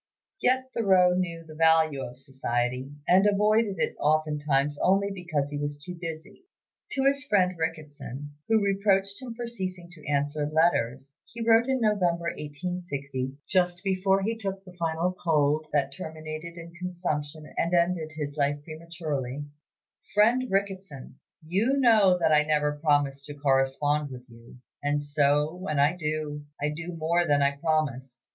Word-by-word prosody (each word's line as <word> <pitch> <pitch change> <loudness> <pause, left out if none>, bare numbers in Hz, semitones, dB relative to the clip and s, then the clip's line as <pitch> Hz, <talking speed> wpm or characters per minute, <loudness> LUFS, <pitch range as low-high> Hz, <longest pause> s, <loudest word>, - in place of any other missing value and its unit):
Yet 260 +1 +1
Thoreau 190 -5 +4
knew 170 -2 -2
the 155 - -11
value 160 -3 +3
of 125 0 -8
society, 130 -1 -2 0.2
and 190 +3 +5
avoided 210 0 +3
it - - -1
oftentimes 150 -2 +1
only 195 +2 +2
because 165 -7 -2
he 145 - -3
was 145 0 -3
too 165 +5 -7
busy. 165 - -8 0.5
To 270 - 0
his 280 +1 +3
friend 185 -7 +2
Ricketson, 145 -4 -5 0.2
who 220 -2 +3
reproached 195 +1 +1
him 240 -3 -7
for 240 +1 -4
ceasing 185 -6 -6
to 160 -4 -15
answer 145 +1 0
letters, 140 -4 +1 0.2
he 230 0 -5
wrote 230 +2 +5
in 265 -1 +1
November, 175 -6 +1
1860, 145 -4 -4
just 180 -1 +1
before 195 0 +2
he 225 +3 0
took 195 -3 -5
the 180 - -11
fatal 165 +3 0
cold 155 -2 +2
that 140 -2 +1
terminated 155 +2 -7
in 170 0 -10
consumption 160 -4 -3
and 170 - 0
ended 170 -2 +1
his 145 -2 -4
life 145 -1 +1
prematurely: 155 -4 -5 0.7
"FRIEND 235 +5 +4
RICKETSON, 190 -9 -3 0.3
You 210 - +1
know 215 -8 +5
that 165 -2 +2
I 150 -1 +6
never 150 -1 +1
promised 145 -2 +1
to 145 - -8
correspond 145 +1 +1
with 125 -1 -10
you, 115 0 -15 0.2
and 145 0 +1
so, 145 +1 +2
when 180 -4 -4
I 145 +5 +4
do, 150 -3 -3 0.2
I 145 - 0
do 165 +3 -5
more 170 +2 +1
than 145 -1 +3
I 140 0 +2
promised. 140 -5 -1
160 Hz, 155 wpm, -27 LUFS, 145-185 Hz, 0.7 s, I